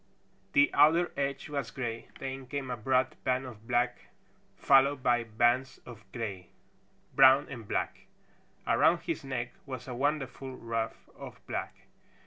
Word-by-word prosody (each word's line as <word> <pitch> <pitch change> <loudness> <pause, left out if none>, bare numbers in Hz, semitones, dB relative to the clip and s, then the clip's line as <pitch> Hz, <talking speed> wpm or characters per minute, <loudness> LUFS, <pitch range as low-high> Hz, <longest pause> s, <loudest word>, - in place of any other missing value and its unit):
The 285 0 +5
outer 160 +4 +5
edge 140 -1 -2
was 140 -5 -3
gray, 115 -3 -5
then 135 -1 -6
came 135 -1 -4
a - - -1
broad 130 +3 +1
band 130 +1 0
of 115 -3 -11
black, 120 0 0 0.5
followed 135 0 +4
by 120 -1 +3
bands 120 +4 +1
of 110 -5 -13
gray, 100 -6 -5 0.6
brown 135 +1 +7
and 115 -6 -8
black. - - -3 0.6
Around - - +3
his - - -4
neck 120 -3 -4
was 130 -2 -7
a 125 - -5
wonderful 135 -1 -2
ruff 115 -2 -4
of - - -10
black. - - -5
130 Hz, 140 wpm, -30 LUFS, 120-135 Hz, 0.6 s, brown